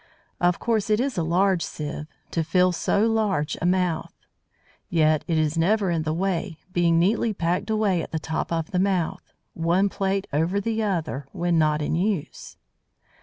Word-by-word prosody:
Of 175 0 +2
course 220 -3 0
it 215 0 +3
is 265 0 -1
a 175 - 0
large 180 +2 +2
sieve, 150 -1 -5 0.2
to 165 - 0
fill 180 +3 +3
so 200 +4 +1
large 210 -9 0
a 175 - +1
mouth. 180 -2 0 0.7
Yet 155 -2 +3
it 165 -3 +1
is 155 +1 +1
never 195 +2 +2
in 165 -2 0
the 155 0 -2
way, 180 0 -2 0.2
being 170 -1 +3
neatly 210 +5 +2
packed 175 +5 -1
away 210 -5 +1
at - - -6
the 160 - -1
top 160 +1 -3
of 165 -1 -2
the 180 - 0
mouth, 185 -4 -1 0.2
one 175 +4 +2
plate 195 0 -1
over 165 +7 +1
the 225 +2 -1
other, 160 -9 -2
when 175 -1 +1
not 150 -1 +2
in - - -1
use. 180 -1 -2
175 Hz, 175 wpm, -24 LUFS, 160-200 Hz, 0.7 s, it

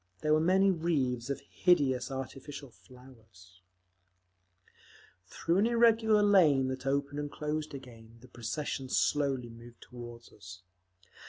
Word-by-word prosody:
There 155 - +2
were 155 - +4
many 190 +3 +4
wreaths 140 -8 -1
of 140 - -3
hideous 140 -9 +1
artificial 135 +1 -7
flowers…. 110 -9 -18 1.7
Through 170 - -1
an 215 - +3
irregular 225 -2 +4
lane 155 -10 +4
that 130 +1 -5
opened 140 +1 -1
and 145 0 -4
closed 150 0 -4
again 115 -4 -13
the 130 - -16
procession 130 +3 -5
slowly 135 -5 0
moved 120 +1 -14
toward 120 -1 -11
us. 90 -2 -12
135 Hz, 120 wpm, -30 LUFS, 120-155 Hz, 1.7 s, were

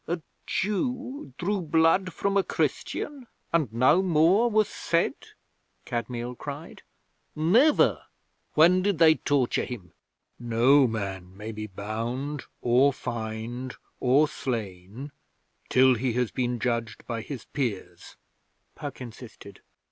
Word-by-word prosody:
'A 170 +2 -1 0.3
Jew 250 - -2
drew 195 +2 -1
blood 165 +3 +3
from 200 +3 -1
a 200 - +5
Christian 275 +6 -3 0.3
and 155 -9 +2
no 125 +10 +4
more 185 +6 +4
was 215 -1 +3
said?' 170 0 -1 0.6
Kadmiel 120 +1 -3
cried. 145 +5 -8 0.5
'Never! 225 - +4 0.5
When 175 +4 +6
did 200 -2 +1
they 160 -1 +7
torture 145 -5 0
him?' 95 -10 -8 0.5
'No 120 +4 +4
man 95 -4 -5
may 110 +2 -6
be 110 0 -6
bound, 115 +8 -4 0.2
or 125 +4 +4
fined, 120 +1 -5 0.2
or 135 +4 +4
slain 110 +1 -5 0.6
till 130 0 +5
he 125 +1 -1
has 125 -1 0
been 125 -1 -1
judged 115 -2 -2
by 115 -1 -3
his 130 +1 -7
peers,' 120 -9 -4 0.6
Puck 145 -3 -7
insisted. 115 -4 -11
130 Hz, 120 wpm, -27 LUFS, 115-165 Hz, 0.6 s, they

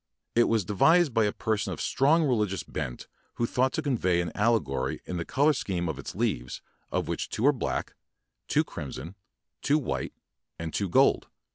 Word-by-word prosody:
It 120 0 +5
was 110 -4 +1
de 105 - -3
vised 160 - +4
by 110 -1 +3
a 105 - +1
person 110 0 -1
of - - -8
strong 155 +5 +3
religious 105 -9 0
bent 60 - -5 0.3
who 120 - 0
thought 130 +3 +1
to 160 - -2
convey 100 -11 +1
an 85 -2 -2
alle 115 +2 +3
gory 65 -4 -3
in 90 - -4
the 85 - -3
color 145 +3 +3
scheme 90 -9 -2
of 75 -4 -4
its - - -7
leaves, - - -2 0.3
of - - -1
which - - -3
two 115 - -1
are 145 - +6
black, 125 - -3 0.5
two - - +3
crimson, 85 +4 -7 0.5
two 145 - +3
white, 145 - -3 0.4
and 80 -1 -5
two 100 -2 -1
gold. - - +4
110 Hz, 190 wpm, -28 LUFS, 85-135 Hz, 0.5 s, are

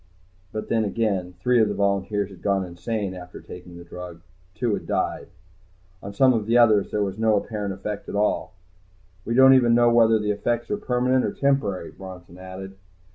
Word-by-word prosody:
But 110 - -5
then 110 -1 +1
again, 100 -4 -1
three 125 +2 +3
of 110 - +3
the 105 - -3
volunteers 100 0 0
had 95 - -14
gone 100 -1 0
insane 95 +3 -4
after 90 -1 -10
taking 90 -1 -11
the 85 - -10
drug. 85 -1 -9 0.3
Two 120 -4 -1
had - - -4
died. - - -2 0.7
On 100 - -7
some 130 +5 +4
of 110 -3 -2
the 115 +2 +3
others 110 -4 +4
there 105 - 0
was 100 +1 -4
no 110 -1 +3
apparent 105 -1 -3
effect 100 +2 -6
at - - -5
all. 105 -2 0 0.7
"We 115 - -1
don't 130 +1 +8
even 120 -3 +4
know 120 0 +4
whether 115 -1 +5
the 105 -1 -1
effects 120 +3 -2
are 210 - 0
permanent 125 -7 +1
or - - -1
temporary," 120 -11 0
Bronson 90 -2 -11
had 95 - -11
added. 95 0 -9
105 Hz, 195 wpm, -24 LUFS, 95-115 Hz, 0.7 s, don't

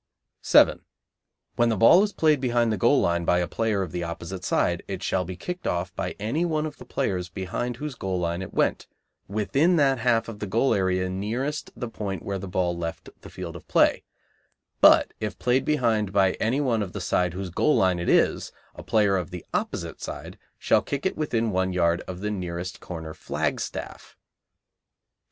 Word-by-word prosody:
7. - - +5 0.8
When 120 0 +4
the 110 - 0
ball 140 - +7
is 210 0 +1
played 155 -7 +2
behind 120 -3 +2
the 110 - 0
goal 120 +9 +4
line 85 0 +1
by 90 - +2
a 90 -1 0
player 110 -4 0
of 90 - -6
the 90 -1 -3
opposite 85 +2 -6
side, 85 -1 +1
it 95 0 -5
shall 90 -1 0
be 90 +1 -6
kicked 180 - -5
off 90 +2 -2
by - - -3
any 115 - -1
one 155 -3 0
of 150 -2 -6
the - - -12
players 90 -9 -2
behind 95 +7 -3
whose 150 +1 -5
goal 95 -6 -3
line 85 +1 -2
it 95 - -7
went, - - 0 0.4
within 135 - +2
that 135 -5 +3
half 115 -1 +2
of 110 -2 -8
the 105 - -4
goal 115 +7 +2
area 95 -1 +1
nearest 115 +11 -3
the 120 - -4
point 100 -5 -5
where 100 -1 -3
the 100 - -6
ball 90 -1 0
left 85 -1 -5
the - - -11
field 85 -3 -7
of - - -11
play; - - +3 0.8
but - - +6
if 105 - -4
played 125 +1 +1
behind 115 -9 +1
by 95 -1 +4
any 120 +6 +1
one 120 -6 +1
of 95 -3 -4
the 105 - -4
side 90 0 0
whose 95 -1 -5
goal 150 - +2
line 90 -2 +2
it 85 - -2
is, - - +2 0.2
a - - -10
player 105 -3 +2
of 90 -4 -3
the 90 -1 -8
opposite - - -3
side - - -7 0.2
shall - - +3
kick 140 -1 -4
it 190 - 0
within 115 -7 0
one 95 0 0
yard 85 -1 +2
of 90 0 -6
the 105 +1 -2
nearest 90 -2 -4
corner 80 -3 -7
flagstaff[B]. - - -4
100 Hz, 200 wpm, -25 LUFS, 90-120 Hz, 0.8 s, ball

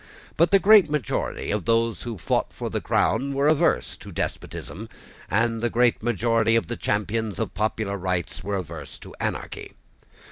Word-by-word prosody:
But 170 +2 +4
the 200 - +6
great 200 -4 +6
majority 150 - -2
of 105 -2 -1
those 115 -3 +1
who 115 -3 -5
fought 85 - 0
for - - -5
the - - -2
crown 135 +7 +1
were 140 +1 +1
averse 150 - +2
to - - -11
despotism; 110 +5 -5 0.4
and 115 +3 +1
the 120 - +1
great 120 +1 +2
majority 115 0 +2
of 115 - +2
the 120 - -4
champions 105 0 -1
of 110 - -3
popular 105 -1 -1
rights 90 -2 -3
were 100 +1 -2
averse 85 -3 -7
to - - -12
anarchy. - - -4
115 Hz, 170 wpm, -25 LUFS, 100-120 Hz, 0.4 s, the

